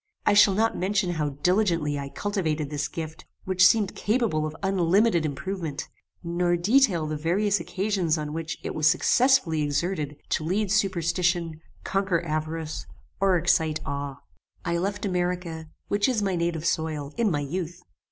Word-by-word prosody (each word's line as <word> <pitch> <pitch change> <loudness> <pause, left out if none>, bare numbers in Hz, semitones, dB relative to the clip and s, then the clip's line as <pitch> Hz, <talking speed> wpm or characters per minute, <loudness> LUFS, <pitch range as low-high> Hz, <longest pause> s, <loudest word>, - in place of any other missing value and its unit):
I 210 - +4
shall 205 -1 +6
not 225 +2 +2
mention 190 -1 0
how 155 -3 -1
diligently 165 -1 +1
I 140 0 -5
cultivated 160 -7 -2
this 145 -1 -1
gift, 160 -1 -7 0.2
which 185 0 +2
seemed 210 -1 +5
capable 210 -9 0
of 155 - -7
unlimited 190 -1 +3
improvement; 160 0 -4 0.3
nor 175 +1 +1
detail 200 - +3
the 155 0 -3
various 190 +7 +1
occasions 190 -5 0
on 150 -1 -4
which 165 0 -4
it - - -4
was 155 0 +2
successfully 195 - +3
exerted 150 0 -1
to - - 0
lead 190 +4 0
superstition, 175 -4 0 0.2
conquer 190 -3 0
avarice, 155 0 -3 0.3
or 195 -2 +3
excite 160 -2 +2
awe. 140 -1 -5 0.4
"I 170 0 0
left 200 +3 -2
America, 175 -3 -2 0.2
which 205 +3 +1
is 225 -5 0
my 195 -2 0
native 170 -2 -1
soil, 155 -4 -1
in 230 -2 +2
my 150 -5 0
youth. 170 +4 -4
175 Hz, 150 wpm, -26 LUFS, 155-195 Hz, 0.4 s, shall